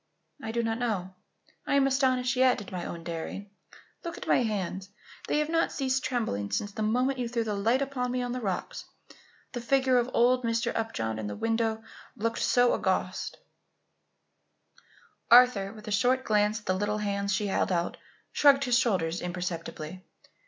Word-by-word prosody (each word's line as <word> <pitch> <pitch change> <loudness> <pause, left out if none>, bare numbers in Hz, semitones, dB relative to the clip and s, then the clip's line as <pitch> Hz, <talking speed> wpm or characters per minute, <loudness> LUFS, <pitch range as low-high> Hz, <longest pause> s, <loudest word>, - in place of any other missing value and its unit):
"I 220 - -4
do 235 +1 -1
not 225 0 -1
know. 200 -6 -2 0.5
I - - +2
am 275 -1 +4
astonished 260 -1 +2
yet, 255 0 +4
at 205 - -9
my 180 -2 -4
own 170 -1 -6
daring. 170 +4 -6 0.5
Look 340 -1 -5
at - - -7
my - - +3
hands. 195 -4 -3 0.4
They - - +1
have 300 0 0
not 330 0 +1
ceased 265 -1 -1
trembling 105 - -2
since 205 - -2
the 215 - -6
moment 250 +5 +1
you 240 -2 -2
threw 235 -1 -1
the 215 -2 -2
light 230 +7 +1
upon 255 -3 -3
me 250 0 -1
on 245 - -3
the 250 +1 -3
rocks. 195 -5 -3 0.7
The 245 - -5
figure 260 +1 +3
of 240 +1 -1
old 250 +1 +3
Mr. 230 0 0
Upjohn 110 - -2
in 110 - -4
the 105 - -5
window 225 - -1 0.3
looked 230 +2 -2
so 245 0 +3
august." - - -1 1.9
Arthur, 235 -5 +6
with 215 0 -13
a - - -4
short 250 +5 +2
glance 210 -1 +2
at 210 - -21
the 185 - +1
little 205 +2 -1
hands 200 -1 -1
she 205 +2 0
held 195 -1 0
out, 170 -1 -1 0.4
shrugged 275 -1 +5
his 245 -2 +3
shoulders 180 -9 0
imperceptibly. 175 -1 -5
225 Hz, 180 wpm, -28 LUFS, 195-250 Hz, 1.9 s, Arthur